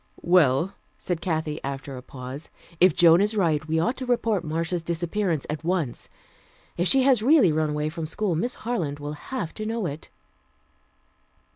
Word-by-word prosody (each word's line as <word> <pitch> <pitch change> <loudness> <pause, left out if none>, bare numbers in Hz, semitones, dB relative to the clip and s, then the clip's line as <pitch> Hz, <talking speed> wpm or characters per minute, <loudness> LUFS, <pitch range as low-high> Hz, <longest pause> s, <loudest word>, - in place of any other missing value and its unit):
"Well," 170 0 +3 0.2
said 175 -2 -3
Kathy 160 -3 -2
after 135 0 -5
a 125 - -7
pause. 130 +3 -9 0.3
"If 180 -3 +5
Joan 170 +1 +6
is 210 +2 0
right, 155 -5 +1
we 160 +1 +1
ought 235 +11 +1
to 260 - -4
report 225 -6 +1
Marcia's 165 +2 -2
disappearance 170 0 -2
at 150 +1 -4
once. 165 -8 -2 0.7
If 175 - 0
she 265 +5 +5
has 260 -4 +4
really 255 - +5
run 155 0 0
away 150 0 -1
from 160 0 -5
school, 190 +3 -1
Miss 240 +11 -2
Harland 170 -12 -2
will 145 +1 -5
have 170 - -5
to 215 - -6
know 225 -1 -2
it." 150 -1 -6
165 Hz, 170 wpm, -25 LUFS, 150-205 Hz, 0.7 s, Joan